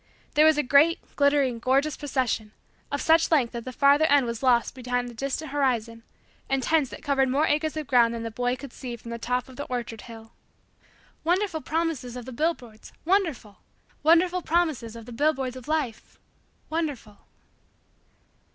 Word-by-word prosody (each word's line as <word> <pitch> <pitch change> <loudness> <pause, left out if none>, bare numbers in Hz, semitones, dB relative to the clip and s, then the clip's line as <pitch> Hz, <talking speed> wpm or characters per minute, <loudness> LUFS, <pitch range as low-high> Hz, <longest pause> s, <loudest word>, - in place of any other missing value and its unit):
There 305 +1 +6
was 315 -1 +4
a 295 - +2
great, 285 +6 +3
glittering, 280 -4 +2
gorgeous, 275 +5 +1
procession, 255 -7 -2 0.4
of 285 - -2
such 325 0 +4
length 275 -8 +2
that 235 -1 -6
the 255 - -5
farther 280 +4 +4
end 285 -3 +4
was 235 -1 -4
lost 245 -3 +3
beyond 245 -1 -2
the - - -11
distant 275 +5 -4
horizon 235 -5 -1 0.5
and 270 -1 0
tents 310 -3 +2
that - - -10
covered 270 -2 +2
more 285 +4 +2
acres 310 +1 0
of 305 - -3
ground 240 -3 +3
than 230 - -5
the 230 - -4
boy 245 +2 -1
could 260 0 -10
see 245 -3 -6
from 235 0 -10
the 235 - -5
top 250 +2 -2
of 260 -2 -14
the 285 - -4
orchard 235 -3 -5
hill. 225 -1 -12 0.9
Wonderful 350 -1 0
promises 310 -7 -2
of 245 - -8
the 260 - -8
billboards! 245 -6 -3
Wonderful! 325 - 0 0.4
Wonderful 350 +3 +4
promises 315 -10 0
of 230 -1 -10
the 245 - -10
billboards 265 -1 0
of 255 -2 -10
Life! 300 -8 -3 0.5
Wonderful! 290 -10 -4
265 Hz, 175 wpm, -26 LUFS, 240-310 Hz, 0.9 s, There